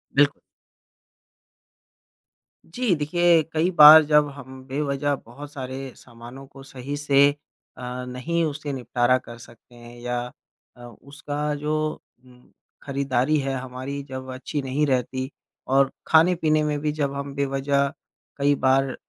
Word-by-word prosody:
बिल्क 145 +1 +4 2.3
जी, 215 +2 0
देखिए, 170 +2 +3
कई 160 +3 +1
बार 155 -2 +10
जब 150 -1 +3
हम 130 -1 -11
बेवजह 140 +1 -1
बहुत 140 +5 -11
सारे 135 -1 -6
सामानों 120 +3 -13
को 135 0 -14
सही 135 +1 -7
से 140 -1 +4 0.5
अ, 125 0 -6
नहीं 130 +7 -2
उसे 150 -1 -4
निपटारा 125 0 +1
कर 120 -2 -11
सकते 120 +1 -17
हैं 120 0 -13
या 120 0 -2 0.6
अ, 120 - -14
उसका 145 +4 -5
जो 150 +1 -3 0.5
उम, 125 -1 -21 0.3
खरीदारी 140 +1 0
है 135 -1 -2
हमारी 130 +2 -6
जब 130 0 -7
अच्छी 140 +3 -4
नहीं 135 +3 -1
रहती 130 0 -1 0.4
और 135 +1 +3 0.2
खाने-पीने 160 -2 +3
में 150 -1 -1
भी 150 +1 -1
जब 145 -2 -2
हम 140 0 -5
बेवजह 140 0 0 0.5
कई 145 0 +2
बार 135 0 +2
140 Hz, 130 wpm, -23 LUFS, 130-150 Hz, 2.3 s, बार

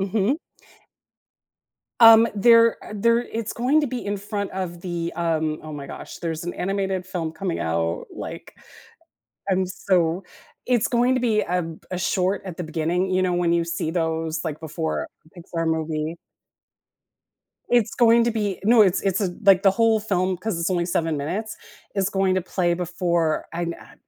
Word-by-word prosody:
Mhm. 205 - +1 1.6
Um, 225 0 +9
there 230 +2 +5
uh, - - -9
there 230 +3 +3
it's 230 -2 -5
going 260 +6 +2
to 295 - 0
be 250 -1 -5
in 205 0 -2
front 200 0 -4
of 180 -2 -4
the, 170 -1 -3
um- 160 -2 -1
oh 155 - -8
my 145 -2 -7
gosh- 135 - -9
there's 165 -1 -4
an 175 - -4
animated 190 -1 -2
film 165 -4 -4
coming 180 +1 -3
out, 85 +1 -1
like - - -8 1.0
I'm 185 0 +1
so 180 -1 0 0.4
it's 245 -3 +2
going 245 +1 +2
to 255 - 0
be 220 -3 +2
ab 170 -2 -3
a 180 - -3
short 185 +1 0
at 185 -4 -7
the 180 - -4
beginning, 165 +4 -1
you 185 0 +2
know, 185 -1 +1
when 175 -1 +1
you 170 0 +2
see 170 -1 -3
those, 160 -1 -2
like, 155 -2 -4
before 160 0 -3 0.3
a 175 - -11
Pixar 165 0 -4
movie. 160 0 -2 1.5
It's 235 -3 +2
going 235 -1 +5
to 235 - +1
be 210 -4 -2
No, 225 +1 +6
it's 190 -3 +2
it's 195 0 0
a 180 -4 -1
like, 195 -1 +6
the 195 - +6
whole 225 +2 +3
film- 185 -3 0
'cause 185 0 -3
it's 170 +2 -1
only 175 -2 0
7 165 -2 0
minutes- 195 +10 -4 0.4
is 195 -2 +1
going 190 -2 +1
to 185 - 0
play 175 -1 0
before 170 -2 -1
I 170 +1 -3
n 170 0 -2
uh, - - -15
185 Hz, 180 wpm, -23 LUFS, 165-210 Hz, 1.6 s, Um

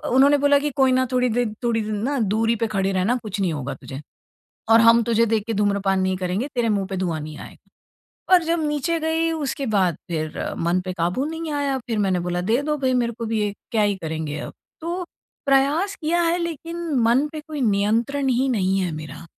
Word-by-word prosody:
उन्होंने 280 +2 +6
बोला 285 0 +4
कि 295 +1 -1
"कोई 265 -1 +4
ना, 260 0 +3
थोड़ी 250 0 +2
दे 240 +2 +1 0.2
थोड़ी 230 -2 +1
दिन 215 0 -3
ना 275 +2 0
दूरी 225 +2 +1
पे 230 0 -1
खड़े 195 -2 0
रहना 190 +6 +1
कुछ 210 -1 -5
नहीं 185 -3 +1
होगा 140 -2 -4
तुझे। 135 +1 -9 0.7
और 225 0 +7
हम 230 +1 +6
तुझे 230 0 +2
देख 220 -2 0
के 225 - -2
धूम्रपान 200 -2 +1
नहीं 185 0 0
करेंगे, 185 +8 -2
तेरे 240 -2 +1
मुँह 200 -3 0
पे 190 - -2
धुआँ 175 -4 -2
नहीं 150 0 -8
आएगा।" - - -13 0.6
और 360 -2 +6
जब 335 +1 0
नीचे 300 +3 0
गई 320 +1 0
उसके 290 -3 -3
बाद 185 -5 +2
फिर 155 -2 -3 0.2
मन 170 +2 +1
पे 185 - -3
काबू 180 +10 -1
नहीं 320 0 -4
आया। 285 -2 0
फिर 230 -2 -1
मैंने 190 -3 +1
बोला 175 0 -2
"दे 225 +8 +1
दो 300 0 -1
भई 260 -2 +1
मेरे 240 -2 +1
को 230 - -2
भी 220 -1 -1
एक, 205 - -7
क्या 225 -3 +2
ही 205 -1 +2
करेंगे 155 -2 -3
अब।" - - -7 0.3
तो 345 +3 -3 0.4
प्रयास 285 +8 +2
किया 335 +3 +1
है 335 +1 +2
लेकिन 335 0 -4 0.2
मन 260 +6 +3
पे 310 - -6
कोई 305 -2 -4
नियंत्रण 230 +6 +1
ही 260 +2 +2
नहीं 195 -5 +1
है 180 -3 -1
मेरा। 155 0 -8
230 Hz, 220 wpm, -22 LUFS, 190-285 Hz, 0.7 s, और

